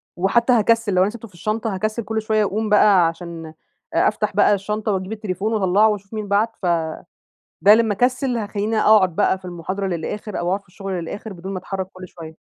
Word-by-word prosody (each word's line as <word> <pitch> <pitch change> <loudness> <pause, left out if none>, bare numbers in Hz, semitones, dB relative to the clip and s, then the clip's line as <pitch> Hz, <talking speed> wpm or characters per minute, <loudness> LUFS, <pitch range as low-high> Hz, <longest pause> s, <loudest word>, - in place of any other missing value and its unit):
وحتى 235 +7 +2
هاكسل 225 -2 +2
لو 185 - +3
أنا 190 - +3
سِبته 230 +1 -9
في 195 - -24
الشنطة 215 +4 -2
هاكسل 215 +4 -2
كل 220 +1 -2
شوية 215 0 +1
أقوم 215 +2 -1
بقى 205 -4 +5
عشان 165 0 -6 0.5
أ - - +3
أفتح - - -1
بقى - - +5
الشنطة 210 +2 -2
وأجيب 190 0 -3
التليفون 210 0 -3
وأطلعه 205 +1 +3
وأشوف 200 -1 -5
مين 215 -1 -4
بعت، 210 +3 +1
ف - - -4 1.0
ده 205 +4 +8
لما 220 -2 +2
أكسل 250 +3 0
هاخليني 210 0 -2
أقعد 200 -6 +4
بقى 195 -2 +2
في 185 - -26
المحاضرة 185 +3 -4
للآخر 190 +4 -4
أو 175 - -2
أقعد 195 +2 0
في - - -34
الشغل 195 +2 -7
للآخر، 185 +4 -5
بدون 190 +1 -7
ما 190 - -3
أتحرك 190 0 -5
كل 185 0 -10
شوية. 160 -2 -11
205 Hz, 205 wpm, -21 LUFS, 185-220 Hz, 1.0 s, ده